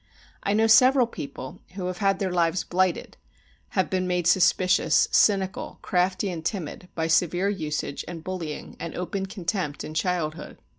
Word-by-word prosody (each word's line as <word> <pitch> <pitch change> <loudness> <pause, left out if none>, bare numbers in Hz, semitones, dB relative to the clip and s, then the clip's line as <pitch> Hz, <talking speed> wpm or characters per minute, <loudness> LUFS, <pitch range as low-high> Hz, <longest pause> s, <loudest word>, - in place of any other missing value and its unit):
I 200 - 0
know 220 +1 +3
several 250 +3 +6
people 140 - -8 0.2
who 190 -2 -4
have 180 0 -4
had 195 -1 +2
their 190 -1 -2
lives 170 -1 +1
blighted, 185 0 -1 0.6
have 190 - +3
been 185 -1 0
made 180 -1 0
suspicious, 180 -2 +4
cynical, 195 -2 +2
crafty, 185 +1 0
and 165 -2 -6
timid, 180 -1 -4
by 160 - -1
severe 175 +3 +2
usage 150 -7 -3
and 170 -2 -7
bullying 170 -5 -5
and 170 - -6
open 190 +2 -3
contempt 180 -6 -3
in 155 - -7
childhood. 160 -2 -2
180 Hz, 155 wpm, -25 LUFS, 165-195 Hz, 0.6 s, several